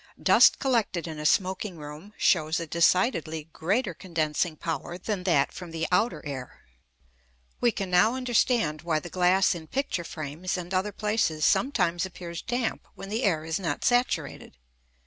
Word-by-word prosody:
Dust -, -, +6 dB
collected 225 Hz, -10 st, 0 dB
in 155 Hz, -2 st, -6 dB
a 150 Hz, -, +1 dB
smoking 190 Hz, +1 st, 0 dB
room 155 Hz, +8 st, -10 dB
shows 160 Hz, -3 st, +2 dB
a 170 Hz, -, -4 dB
decidedly 165 Hz, -1 st, +1 dB
greater 195 Hz, +4 st, 0 dB
condensing 165 Hz, -2 st, -2 dB
power 165 Hz, +2 st, -4 dB
than 185 Hz, 0 st, -4 dB
that 145 Hz, -7 st, +3 dB
from 180 Hz, -2 st, -8 dB
the 165 Hz, 0 st, -3 dB
outer 215 Hz, +3 st, +1 dB
air. 135 Hz, -3 st, -7 dB, 1.0 s
We 240 Hz, -, +3 dB
can 195 Hz, -4 st, -4 dB
now 210 Hz, +7 st, +4 dB
understand 240 Hz, -10 st, +1 dB
why 165 Hz, -2 st, 0 dB
the 170 Hz, +2 st, -6 dB
glass 185 Hz, +1 st, +3 dB
in 165 Hz, -2 st, -8 dB
picture 265 Hz, -, -2 dB
frames 160 Hz, +4 st, -4 dB
and 180 Hz, +1 st, -6 dB
other 190 Hz, +3 st, 0 dB
places 210 Hz, -7 st, 0 dB
sometimes 180 Hz, -10 st, +2 dB
appears 175 Hz, -2 st, -6 dB
damp 245 Hz, -1 st, -2 dB
when 195 Hz, -, -9 dB
the 220 Hz, +4 st, -1 dB
air 165 Hz, -9 st, +1 dB
is 160 Hz, +2 st, -2 dB
not 165 Hz, -6 st, -3 dB
saturated. 245 Hz, -, 0 dB
180 Hz, 160 wpm, -27 LUFS, 160-210 Hz, 1.0 s, Dust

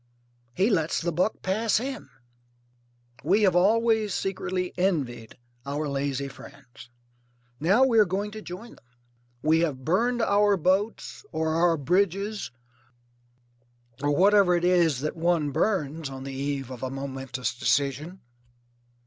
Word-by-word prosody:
He 195 Hz, +6 st, +2 dB
lets 165 Hz, -5 st, +1 dB
the 170 Hz, +1 st, -2 dB
buck 180 Hz, +6 st, -1 dB
pass 215 Hz, +4 st, +1 dB
him. 260 Hz, -, -5 dB, 1.1 s
We 195 Hz, +8 st, +3 dB
have 185 Hz, -3 st, +3 dB
always 220 Hz, +2 st, +3 dB
secretly 185 Hz, -1 st, -3 dB
envied 135 Hz, -, -2 dB, 0.3 s
our 145 Hz, +2 st, -3 dB
lazy 140 Hz, -1 st, -2 dB
friends. 135 Hz, -3 st, -14 dB, 0.7 s
Now 195 Hz, -, +4 dB
we 235 Hz, -4 st, +3 dB
are 210 Hz, -, +6 dB
going 200 Hz, +3 st, -3 dB
to 215 Hz, 0 st, -8 dB
join 210 Hz, +6 st, -9 dB
them. -, -, -21 dB, 0.6 s
We 160 Hz, +1 st, +3 dB
have 140 Hz, -6 st, -2 dB
burned 235 Hz, +8 st, +1 dB
our 205 Hz, -1 st, +3 dB
boats 190 Hz, +6 st, -1 dB
or 160 Hz, -1 st, -1 dB
our 165 Hz, 0 st, +3 dB
bridges 195 Hz, +7 st, 0 dB, 1.5 s
or 145 Hz, -, 0 dB
whatever 190 Hz, +3 st, +4 dB
it 175 Hz, 0 st, 0 dB
is 170 Hz, -7 st, +3 dB
that 150 Hz, +3 st, -3 dB
one 165 Hz, -3 st, +1 dB
burns 155 Hz, -4 st, -1 dB
on 135 Hz, -1 st, -8 dB
the 135 Hz, 0 st, -6 dB
eve 135 Hz, -1 st, -3 dB
of 125 Hz, -, -8 dB
a 130 Hz, -, -3 dB
momentous 135 Hz, -2 st, -4 dB
decision. 140 Hz, +7 st, -1 dB
170 Hz, 135 wpm, -26 LUFS, 140-200 Hz, 1.5 s, are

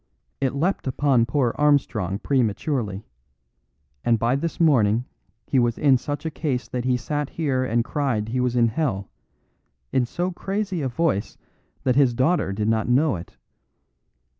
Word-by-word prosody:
It 135 Hz, 0 st, 0 dB
leapt 170 Hz, +2 st, 0 dB
upon 130 Hz, -3 st, +2 dB
poor 125 Hz, -2 st, +1 dB
Armstrong 125 Hz, -10 st, +2 dB
prematurely, 115 Hz, -3 st, -1 dB, 1.0 s
and 115 Hz, -1 st, +3 dB
by 120 Hz, +4 st, +1 dB
this 165 Hz, +4 st, -3 dB
morning 120 Hz, -8 st, +3 dB, 0.4 s
he 135 Hz, -, +2 dB
was 120 Hz, -1 st, +1 dB
in 140 Hz, -3 st, +4 dB
such 145 Hz, +5 st, -5 dB
a 160 Hz, -, -2 dB
case 140 Hz, -5 st, -2 dB
that 125 Hz, -1 st, -4 dB
he 125 Hz, -1 st, +2 dB
sat 145 Hz, +3 st, -3 dB
here 135 Hz, -6 st, -1 dB
and 120 Hz, -2 st, 0 dB
cried 120 Hz, -8 st, -1 dB
he 125 Hz, +2 st, -1 dB
was 125 Hz, -1 st, 0 dB
in 115 Hz, -1 st, +4 dB
hell, 110 Hz, -7 st, -2 dB, 0.8 s
in 125 Hz, -2 st, +1 dB
so 175 Hz, +8 st, -2 dB
crazy 195 Hz, -1 st, -3 dB
a 135 Hz, -, 0 dB
voice 125 Hz, -6 st, -1 dB, 0.5 s
that 130 Hz, -2 st, +2 dB
his 130 Hz, -4 st, +4 dB
daughter 130 Hz, -, +2 dB
did 105 Hz, +2 st, -2 dB
not 110 Hz, +1 st, +1 dB
know 140 Hz, +2 st, +3 dB
it. 85 Hz, 0 st, -10 dB
130 Hz, 160 wpm, -23 LUFS, 115-145 Hz, 1.0 s, in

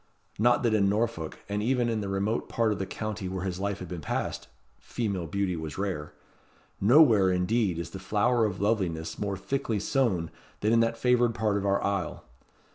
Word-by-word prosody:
Not 120 Hz, +3 st, +4 dB
that 115 Hz, -2 st, +2 dB
in 100 Hz, -2 st, +3 dB
Norfolk, 105 Hz, -6 st, -1 dB
and 105 Hz, 0 st, -2 dB
even 120 Hz, +1 st, +1 dB
in 115 Hz, -2 st, -1 dB
the 100 Hz, -, -4 dB
remote 100 Hz, +4 st, -1 dB
part 115 Hz, -2 st, +1 dB
of 105 Hz, -, -2 dB
the 95 Hz, -, -3 dB
county 110 Hz, -3 st, -4 dB
where 95 Hz, 0 st, -4 dB
his 95 Hz, -1 st, -3 dB
life 100 Hz, 0 st, -1 dB
had 90 Hz, -, -7 dB
been 85 Hz, -1 st, -6 dB
passed, -, -, -3 dB, 0.3 s
female 100 Hz, -8 st, -3 dB
beauty 100 Hz, +1 st, -1 dB
was 80 Hz, -3 st, -6 dB
rare. 95 Hz, -7 st, -3 dB, 0.7 s
Nowhere, 110 Hz, -4 st, +6 dB
indeed, 90 Hz, +1 st, +1 dB
is 85 Hz, 0 st, -5 dB
the 95 Hz, -, -7 dB
flower 110 Hz, +5 st, +2 dB
of 100 Hz, -3 st, -3 dB
loveliness 95 Hz, -7 st, -1 dB
more 100 Hz, -2 st, -2 dB
thickly 115 Hz, +1 st, -2 dB
sown 100 Hz, -, 0 dB, 0.3 s
than 105 Hz, +2 st, +2 dB
in 115 Hz, -, +5 dB
that 115 Hz, 0 st, +1 dB
favoured 120 Hz, -1 st, +2 dB
part 110 Hz, -3 st, +1 dB
of 100 Hz, 0 st, -1 dB
our 100 Hz, 0 st, +1 dB
isle. 100 Hz, -5 st, -2 dB
100 Hz, 195 wpm, -28 LUFS, 95-115 Hz, 0.7 s, Nowhere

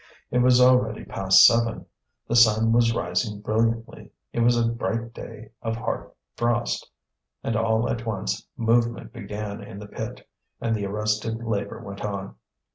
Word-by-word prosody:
It 125 Hz, -, +2 dB
was 125 Hz, 0 st, +5 dB
already 125 Hz, -3 st, +4 dB
past 95 Hz, 0 st, +6 dB
seven. 115 Hz, -1 st, +3 dB, 0.4 s
The -, -, -1 dB
sun 115 Hz, -1 st, +5 dB
was 115 Hz, 0 st, +4 dB
rising 105 Hz, +1 st, -1 dB
brilliantly; 115 Hz, +2 st, -1 dB, 0.2 s
it -, -, -2 dB
was 120 Hz, +1 st, +4 dB
a 115 Hz, -1 st, +2 dB
bright 115 Hz, 0 st, -3 dB
day 110 Hz, -1 st, -10 dB
of 115 Hz, -1 st, -2 dB
hard 115 Hz, -, -4 dB, 0.3 s
frost; 120 Hz, 0 st, -1 dB, 0.5 s
and 115 Hz, -, -1 dB
all 115 Hz, 0 st, +1 dB
at 115 Hz, -, -2 dB
once 100 Hz, -, -3 dB
movement 115 Hz, 0 st, +1 dB
began 105 Hz, -2 st, -6 dB
in 95 Hz, -, -9 dB
the 105 Hz, -, -8 dB
pit, 105 Hz, -, -7 dB, 0.3 s
and 115 Hz, -1 st, 0 dB
the 100 Hz, -2 st, -2 dB
arrested 105 Hz, +2 st, -2 dB
labour 100 Hz, -3 st, -3 dB
went 100 Hz, 0 st, -8 dB
on. 100 Hz, -2 st, -4 dB
115 Hz, 155 wpm, -25 LUFS, 105-115 Hz, 0.5 s, past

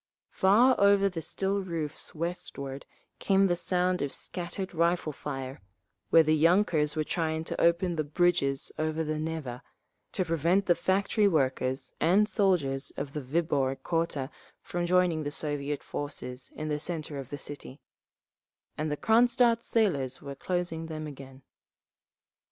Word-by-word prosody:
Far 225 Hz, +7 st, +5 dB
over 200 Hz, 0 st, +5 dB
the 175 Hz, -3 st, -5 dB
still 195 Hz, +4 st, -1 dB
roofs 165 Hz, -5 st, -4 dB
westward 140 Hz, -5 st, -5 dB, 0.3 s
came 195 Hz, 0 st, +3 dB
the 175 Hz, -2 st, +2 dB
sound 180 Hz, +1 st, +1 dB
of 140 Hz, -, -1 dB
scattered 185 Hz, +2 st, -4 dB
rifle 170 Hz, -2 st, +1 dB
fire, 135 Hz, -1 st, -6 dB, 0.5 s
where 165 Hz, -, +7 dB
the 155 Hz, 0 st, +3 dB
yunkers 160 Hz, -2 st, +3 dB
were 155 Hz, -, +1 dB
trying 160 Hz, 0 st, -1 dB
to -, -, -4 dB
open 170 Hz, 0 st, +2 dB
the 155 Hz, -, +1 dB
bridges 145 Hz, -3 st, +1 dB
over 155 Hz, +1 st, 0 dB
the 155 Hz, 0 st, -2 dB
Neva, 155 Hz, -6 st, -4 dB, 0.5 s
to 185 Hz, -, 0 dB
prevent 165 Hz, +4 st, +2 dB
the 175 Hz, -, +5 dB
factory 200 Hz, +4 st, +2 dB
workers 130 Hz, -5 st, 0 dB
and 190 Hz, +6 st, +4 dB
soldiers 170 Hz, -11 st, +1 dB
of 140 Hz, 0 st, -4 dB
the 150 Hz, -, -3 dB
Viborg 135 Hz, -2 st, 0 dB
quarter 165 Hz, -5 st, -1 dB, 0.3 s
from 175 Hz, 0 st, -2 dB
joining 180 Hz, -3 st, +3 dB
the 145 Hz, -, -2 dB
Soviet 145 Hz, -1 st, -3 dB
forces 130 Hz, -3 st, -6 dB
in 155 Hz, -, -4 dB
the 150 Hz, -1 st, -1 dB
centre 155 Hz, -3 st, -4 dB
of 135 Hz, -2 st, -8 dB
the 145 Hz, -, -5 dB
city; 145 Hz, 0 st, -9 dB, 1.0 s
and 155 Hz, 0 st, -1 dB
the 150 Hz, -, -1 dB
Cronstadt 235 Hz, -, +4 dB
sailors 145 Hz, -, 0 dB
were 140 Hz, -1 st, -7 dB
closing 170 Hz, +1 st, -3 dB
them 155 Hz, -1 st, -5 dB
again…. 135 Hz, -2 st, -10 dB
160 Hz, 145 wpm, -29 LUFS, 145-180 Hz, 1.0 s, where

